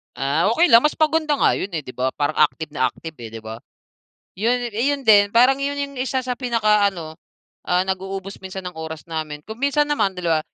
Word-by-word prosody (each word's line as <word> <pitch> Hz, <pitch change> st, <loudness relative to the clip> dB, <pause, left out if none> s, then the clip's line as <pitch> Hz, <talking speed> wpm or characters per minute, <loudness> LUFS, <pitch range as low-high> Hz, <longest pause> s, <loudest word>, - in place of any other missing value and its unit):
Ah, 140 Hz, +6 st, +1 dB
okey 345 Hz, -4 st, +3 dB
lang. 230 Hz, -, +9 dB
Mas 300 Hz, +4 st, 0 dB
maganda 310 Hz, -1 st, +2 dB
nga -, -, +3 dB
yun, 190 Hz, -, -2 dB
eh, 155 Hz, -, -3 dB
di 125 Hz, -, -9 dB
ba 125 Hz, +1 st, -2 dB
parang 145 Hz, +1 st, -1 dB
active 155 Hz, 0 st, +1 dB
na 130 Hz, -3 st, +1 dB
active, 160 Hz, +6 st, -8 dB
eh, 115 Hz, -, -7 dB
di 110 Hz, -, -9 dB
ba? 110 Hz, +1 st, -7 dB, 0.8 s
Yun, 235 Hz, +3 st, +2 dB, 0.2 s
eh, 230 Hz, +5 st, -1 dB
yun 275 Hz, -, -10 dB
din, 205 Hz, -1 st, +7 dB
parang 255 Hz, +4 st, +4 dB
yun 280 Hz, +1 st, -2 dB
yung 280 Hz, -1 st, -4 dB
isa 260 Hz, 0 st, -1 dB
sa 250 Hz, -1 st, -3 dB
pinakaano, 210 Hz, -9 st, +1 dB, 0.5 s
ah, 180 Hz, +1 st, +2 dB
nag-uubos 190 Hz, +1 st, -4 dB
minsan 190 Hz, 0 st, -7 dB
ng 180 Hz, -1 st, -7 dB
oras 160 Hz, -1 st, -7 dB
namin. 155 Hz, -2 st, -5 dB
Kung 220 Hz, +2 st, -9 dB
minsan 280 Hz, +2 st, +2 dB
naman 200 Hz, -10 st, 0 dB
2 170 Hz, -3 st, 0 dB
195 Hz, 210 wpm, -21 LUFS, 160-255 Hz, 0.8 s, lang